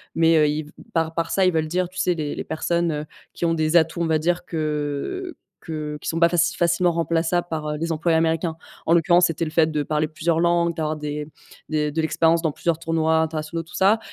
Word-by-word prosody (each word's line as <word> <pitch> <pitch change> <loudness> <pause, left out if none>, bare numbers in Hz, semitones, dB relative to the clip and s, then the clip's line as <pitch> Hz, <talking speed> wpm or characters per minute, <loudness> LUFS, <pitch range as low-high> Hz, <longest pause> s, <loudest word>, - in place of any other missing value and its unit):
mais, 165 0 +4
heu, 150 -1 +4
ils 150 +1 -1
v 150 - -15 0.2
par 165 -1 0
par 165 0 -1
ça 190 - +3
ils 185 - +4
veulent 160 -1 0
dire, 180 +2 -1
tu 185 - -15
sais, 180 -1 +2
les 150 -3 -3
les - - -4
personnes, 170 +1 -1
heu, 150 0 -3 0.3
qui - - -2
ont 165 - +2
des 155 +1 0
atouts, 165 +1 +1
on - - +1
va 160 -1 +2
dire 175 +3 0
que 155 - -3 0.3
que 150 -2 -5
qui - - -4
sont 165 - -1
pas 170 0 +5
faci 170 -1 +2
facilement 175 +1 +2
remplaçables 170 +1 0
par, 155 -2 -3
heu, - - -5
les 165 +2 -2
employés 160 +1 +1
américains. 165 0 0 0.3
En 165 - +3
l'occurrence, 175 +1 +5
c'était 165 0 -2
le 155 - -5
fait 160 0 +3
de 150 -1 -1
parler 155 +1 0
plusieurs 160 +1 -1
langues, 170 -1 +2
d'avoir 155 -1 -1
des 150 0 -4 0.4
des 150 -1 0
de 160 +2 -1
l'expérience 165 +1 +2
dans 160 -2 0
plusieurs 170 +1 -1
tournois 160 -1 +1
internationaux 160 +1 -2
tout 165 - -13
ça, 200 +4 +4
165 Hz, 240 wpm, -23 LUFS, 155-170 Hz, 0.4 s, pas